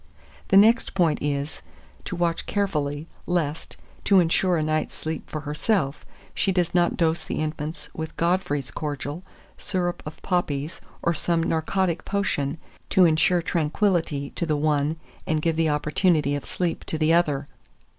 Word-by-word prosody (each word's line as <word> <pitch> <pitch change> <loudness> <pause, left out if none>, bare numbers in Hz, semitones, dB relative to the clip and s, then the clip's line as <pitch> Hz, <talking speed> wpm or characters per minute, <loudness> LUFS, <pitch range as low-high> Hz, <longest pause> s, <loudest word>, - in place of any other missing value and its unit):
The 195 - +5
next 225 +3 +5
point 170 -5 +2
is, 145 +1 -2 0.4
to - - -4
watch 170 -1 -1
carefully, 150 -7 -1 0.2
lest, 165 -3 -1 0.3
to 195 -2 +6
insure 175 +1 +2
a 155 - +1
night's 155 0 -1
sleep 160 0 -5
for 155 - -4
herself, 150 0 -1 0.3
she 195 - +1
does 180 -2 0
not 175 -1 +2
dose 160 -1 +1
the - - -4
infant 155 0 -4
with 160 0 -6
Godfrey's 170 -6 0
cordial, 145 +1 -4 0.4
syrup 175 -2 -2
of 155 +1 -8
poppies, 155 -5 -1 0.2
or 170 - +2
some 165 +1 0
narcotic 170 +2 0
potion, 165 -7 -1 0.3
to 190 -2 +6
insure 170 +2 +3
tranquillity 160 -3 0
to 170 - -3
the 150 -2 +1
one 150 0 +1 0.3
and 155 -1 +1
give 165 +1 0
the 160 -1 +2
opportunity 150 0 +2
of 145 - -3
sleep 175 -2 -2
to 160 - -2
the 155 +1 +3
other. 145 -5 +2
160 Hz, 155 wpm, -25 LUFS, 150-175 Hz, 0.4 s, to